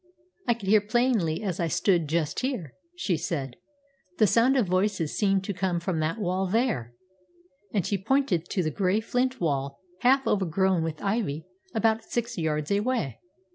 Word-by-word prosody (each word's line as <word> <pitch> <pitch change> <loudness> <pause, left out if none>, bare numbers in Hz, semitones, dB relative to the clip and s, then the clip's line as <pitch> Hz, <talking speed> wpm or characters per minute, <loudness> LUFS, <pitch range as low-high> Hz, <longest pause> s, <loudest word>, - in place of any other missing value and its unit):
"I 240 - +4
could 210 -4 -9
hear 210 +1 +6
plainly 215 -6 +1
as 185 -5 -2
I 170 - +1
stood 170 0 +2
just 160 -2 0
here," 250 - -3 0.2
she 200 - 0
said. 135 -6 -3 0.6
"The 215 - +5
sound 235 +6 +4
of 245 - +3
voices 185 -3 0
seemed 195 -2 +2
to 200 - -3
come 180 -1 -1
from 170 -1 -2
that 155 +5 -1
wall 190 -2 -1
there"; 190 - 0 0.8
and 195 -6 0
she 200 - 0
pointed 225 - +1
to 185 - 0
the 155 - -1
gray 190 +4 +1
flint 250 +3 -1
wall, 140 -4 -1 0.2
half 265 +4 +4
overgrown 190 -1 +2
with 160 -1 -4
ivy, 195 -7 -1 0.3
about 225 0 +2
six 235 +1 -3
yards 155 -2 -1
away. 205 - 0
190 Hz, 170 wpm, -27 LUFS, 165-225 Hz, 0.8 s, hear